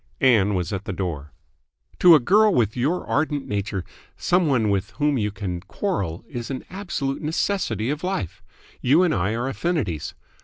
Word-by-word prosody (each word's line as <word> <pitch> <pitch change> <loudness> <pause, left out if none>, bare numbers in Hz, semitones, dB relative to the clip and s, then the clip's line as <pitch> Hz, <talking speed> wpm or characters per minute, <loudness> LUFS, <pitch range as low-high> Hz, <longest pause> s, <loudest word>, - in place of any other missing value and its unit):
Ann 105 -7 +4
was 90 +3 -2
at 100 0 -4
the 100 - -3
door. 80 -6 -4 0.7
"To 175 -2 +8
a - - +6
girl 210 - +4
with 110 - +1
your 145 +9 0
ardent 150 -2 -1
nature 100 -3 -3 0.3
some 180 -1 +2
one 115 -7 +2
with 100 +1 0
whom 145 -3 +2
you 105 -1 0
can 95 -4 -4
quarrel 95 - -3
is 120 -2 -6
an 135 -2 -5
absolute 170 -8 -3
necessity 155 - -1
of 150 +2 -4
life. 180 - -3 0.4
You 150 +8 +4
and 175 - +2
I 95 +4 0
are 120 +3 -2
affinities. 135 - -2
125 Hz, 170 wpm, -23 LUFS, 100-160 Hz, 0.7 s, To